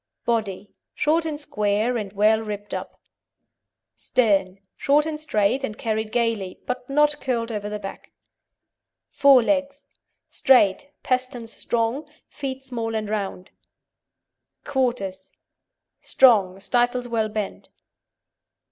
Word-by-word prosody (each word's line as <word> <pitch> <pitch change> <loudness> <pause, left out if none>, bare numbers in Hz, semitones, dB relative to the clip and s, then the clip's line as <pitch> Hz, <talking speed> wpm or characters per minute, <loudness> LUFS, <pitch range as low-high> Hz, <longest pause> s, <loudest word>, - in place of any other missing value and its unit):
BODY 210 -4 -2 0.2
Short 325 +2 +2
and 300 -2 -4
square, 210 -2 0
and 210 -4 -3
well 215 +2 +4
ribbed 205 -1 -6
up. - - -6 1.0
STERN 195 -6 +1 0.2
Short 295 +2 +3
and 310 -1 -3
straight, 245 -2 +1
and 215 -4 -4
carried 220 -1 -2
gaily, 230 -6 -1
but 250 0 -4
not 295 +1 +2
curled 235 -3 -1
over 205 -1 -4
the 210 - -3
back. 195 -1 -9 1.0
FORE 275 -3 +6
LEGS 280 +1 -1 0.4
Straight, 250 +1 +3
pasterns 255 -3 -1
strong, 240 +6 -1 0.2
feet 270 -2 -5
small 230 -4 -4
and 215 -1 -2
round. 195 -3 -4 1.1
QUARTERS 235 -9 -2 0.7
Strong; 200 -7 +4
stifles 245 +2 +1
well 225 -2 0
bent. 210 -1 -5
230 Hz, 110 wpm, -23 LUFS, 210-265 Hz, 1.1 s, FORE